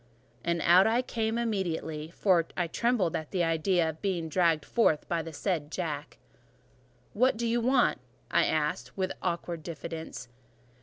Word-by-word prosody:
And 170 Hz, -1 st, 0 dB
I 210 Hz, +8 st, +5 dB
came 225 Hz, -2 st, -1 dB
out 235 Hz, -, 0 dB
immediately, 165 Hz, -7 st, -2 dB
for 175 Hz, -1 st, +2 dB
I 175 Hz, -, +1 dB
trembled 205 Hz, -1 st, 0 dB
at 155 Hz, -1 st, -4 dB
the 180 Hz, -2 st, 0 dB
idea 165 Hz, +1 st, +2 dB
of 160 Hz, 0 st, -5 dB
being 175 Hz, -5 st, -1 dB
dragged 165 Hz, -3 st, +2 dB
forth 160 Hz, -10 st, +2 dB
by 170 Hz, -1 st, 0 dB
the 165 Hz, 0 st, -7 dB
said 160 Hz, -2 st, -2 dB
Jack. 150 Hz, -5 st, -4 dB, 1.0 s
"What 250 Hz, +2 st, +3 dB
do 235 Hz, -, -2 dB
you 235 Hz, +1 st, +1 dB
want?" 250 Hz, +1 st, +3 dB, 0.3 s
I -, -, +4 dB
asked, 150 Hz, -4 st, -1 dB
with 185 Hz, -1 st, 0 dB
awkward 170 Hz, -2 st, -2 dB
diffidence. 160 Hz, -4 st, -7 dB
170 Hz, 155 wpm, -29 LUFS, 160-205 Hz, 1.0 s, I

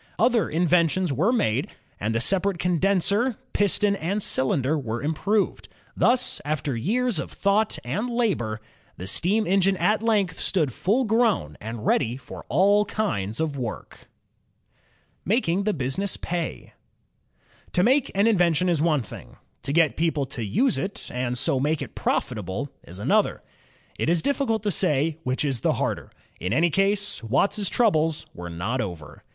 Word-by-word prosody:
Other 230 Hz, -6 st, +2 dB
inventions 170 Hz, 0 st, +2 dB
were 175 Hz, -, +2 dB
made, 215 Hz, -, +1 dB, 0.3 s
and 110 Hz, +3 st, -1 dB
the -, -, +2 dB
separate 195 Hz, +4 st, +1 dB
con 175 Hz, -1 st, 0 dB
denser, 200 Hz, -, +2 dB, 0.2 s
piston, 205 Hz, 0 st, +2 dB
and 195 Hz, +4 st, -2 dB
cylinder 130 Hz, +2 st, +1 dB
were 120 Hz, -5 st, -3 dB
improved. 195 Hz, +8 st, 0 dB, 0.3 s
Thus, 250 Hz, +1 st, +2 dB
after 145 Hz, -3 st, -2 dB
years 225 Hz, -, 0 dB
of 140 Hz, -, -5 dB
thought 205 Hz, +2 st, +1 dB
and 200 Hz, -, -2 dB
labor, 190 Hz, -, -1 dB, 0.4 s
the 90 Hz, -, -6 dB
steam 200 Hz, -, +1 dB
engine 195 Hz, +1 st, +2 dB
at 215 Hz, +3 st, +2 dB
length 205 Hz, -6 st, +1 dB
stood 155 Hz, -10 st, 0 dB
full 230 Hz, -, +1 dB
grown 220 Hz, -, +1 dB
and 110 Hz, 0 st, -6 dB
ready 120 Hz, +3 st, +1 dB
for 135 Hz, -, -10 dB
all 200 Hz, -, +4 dB
kinds 110 Hz, -, -2 dB
of 150 Hz, -4 st, -2 dB
work. 120 Hz, -3 st, -7 dB, 1.1 s
Making 195 Hz, -3 st, +1 dB
the 215 Hz, -, +2 dB
Business 150 Hz, +7 st, -2 dB
Pay 170 Hz, -1 st, -4 dB, 1.0 s
To 180 Hz, -, +3 dB
make 265 Hz, +4 st, +3 dB
an 200 Hz, +2 st, +3 dB
invention 180 Hz, -5 st, +3 dB
is 165 Hz, -4 st, +1 dB
one 155 Hz, -5 st, +2 dB
thing. 95 Hz, -, -12 dB, 0.2 s
To -, -, -4 dB
get 160 Hz, +1 st, +3 dB
people 160 Hz, -4 st, +1 dB
to 120 Hz, -, -4 dB
use 230 Hz, -, +1 dB
it 195 Hz, +1 st, -5 dB
and 125 Hz, 0 st, -2 dB
so 130 Hz, +2 st, +1 dB
make 150 Hz, +3 st, 0 dB
it -, -, -10 dB
profitable 110 Hz, +3 st, -2 dB, 0.2 s
is 90 Hz, -, -10 dB
another. 105 Hz, -, +1 dB, 0.6 s
It -, -, +1 dB
is 170 Hz, -1 st, +2 dB
difficult 250 Hz, -6 st, 0 dB
to 205 Hz, -, +1 dB
say 160 Hz, -3 st, +1 dB
which 130 Hz, 0 st, -1 dB
is 130 Hz, -6 st, -1 dB
the -, -, +2 dB
harder. -, -, -2 dB, 0.3 s
In 90 Hz, +4 st, -2 dB
any 165 Hz, +5 st, +3 dB
case. 200 Hz, +3 st, +1 dB
Watt's 190 Hz, -, +1 dB
troubles 165 Hz, -9 st, +1 dB
were 85 Hz, 0 st, -7 dB
not 100 Hz, +10 st, -2 dB
over. 85 Hz, -7 st, -7 dB
170 Hz, 155 wpm, -25 LUFS, 130-205 Hz, 1.1 s, all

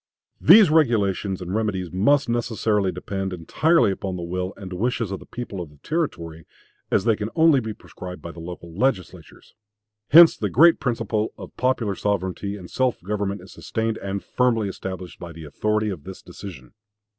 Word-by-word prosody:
These 190 Hz, 0 st, +8 dB
regulations 100 Hz, -, +1 dB
and 90 Hz, +1 st, -5 dB
remedies 100 Hz, -5 st, -1 dB
must 135 Hz, +11 st, +3 dB
necessarily 110 Hz, -4 st, 0 dB
depend 95 Hz, +2 st, -4 dB
entirely 130 Hz, -, +2 dB
upon 95 Hz, -1 st, -4 dB
the 90 Hz, -, -5 dB
will 90 Hz, +2 st, -3 dB
and 95 Hz, -3 st, -8 dB
wishes 115 Hz, +1 st, -1 dB
of 95 Hz, -, -4 dB
the -, -, -15 dB
people 120 Hz, -6 st, -6 dB
of 85 Hz, -, -7 dB
the 75 Hz, -, -20 dB
Territory, 85 Hz, -, -3 dB, 0.4 s
as -, -, +2 dB
they 115 Hz, -2 st, +3 dB
can 105 Hz, +1 st, -4 dB
only 160 Hz, -4 st, +5 dB
be 110 Hz, -3 st, -4 dB
prescribed 90 Hz, -3 st, -9 dB
by 85 Hz, -, -8 dB
the 85 Hz, -, -12 dB
local 85 Hz, 0 st, -8 dB
legislatures. 100 Hz, -, -3 dB, 0.6 s
Hence 165 Hz, +2 st, +9 dB
the 105 Hz, -, -2 dB
great 165 Hz, -, +6 dB
principle 115 Hz, -4 st, -1 dB
of -, -, -10 dB
popular 125 Hz, -4 st, 0 dB
sovereignty 100 Hz, 0 st, -2 dB
and 90 Hz, -3 st, -10 dB
self 130 Hz, +3 st, 0 dB
government 100 Hz, 0 st, -2 dB
is -, -, -14 dB
sustained 110 Hz, 0 st, -2 dB
and 100 Hz, 0 st, -4 dB
firmly 115 Hz, -4 st, +1 dB
established 95 Hz, -2 st, -7 dB
by 85 Hz, -2 st, -8 dB
the 80 Hz, 0 st, -10 dB
authority 105 Hz, +7 st, -1 dB
of 85 Hz, -7 st, -7 dB
this 95 Hz, 0 st, -10 dB
decision." 90 Hz, -6 st, -10 dB
100 Hz, 175 wpm, -23 LUFS, 90-120 Hz, 0.6 s, Hence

